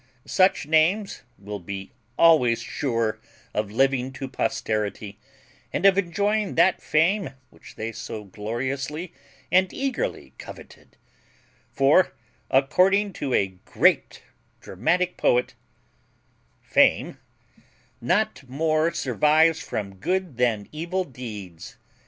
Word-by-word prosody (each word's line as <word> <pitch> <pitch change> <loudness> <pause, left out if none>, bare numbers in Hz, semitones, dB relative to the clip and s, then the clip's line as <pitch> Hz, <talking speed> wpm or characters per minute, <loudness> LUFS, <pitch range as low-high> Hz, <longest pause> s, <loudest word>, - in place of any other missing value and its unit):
Such 185 -4 +2
names 165 +7 +1 0.2
will 100 +1 -7
be 95 +2 -7 0.3
always 140 -9 +5
sure 115 -5 -2 0.3
of 105 -1 -2
living 130 +3 +1
to 135 0 -6
posterity, 105 -4 -3 0.5
and 185 - -2
of 195 -1 +7
enjoying 200 +3 0
that 190 - +3
fame 165 +1 +1 0.2
which - - -16
they 110 +1 -4
so 115 -1 -7
gloriously 130 - -4 0.4
and 185 0 +3
eagerly 275 - -3
coveted; - - -13 0.7
for, 140 +4 +3 0.3
according 185 +9 +3
to 135 -6 -2
a 100 - +2
GREAT - - +1 0.4
dramatic 180 - -1
poet 125 0 +2 1.1
Fame - - +2 0.8
Not 130 - 0
more 155 +4 +1
survives 155 +6 +2
from 100 -2 -5
good 180 - -2
than 115 -5 0
evil 170 +5 -2
deeds. 105 - -9
135 Hz, 105 wpm, -24 LUFS, 110-180 Hz, 1.1 s, of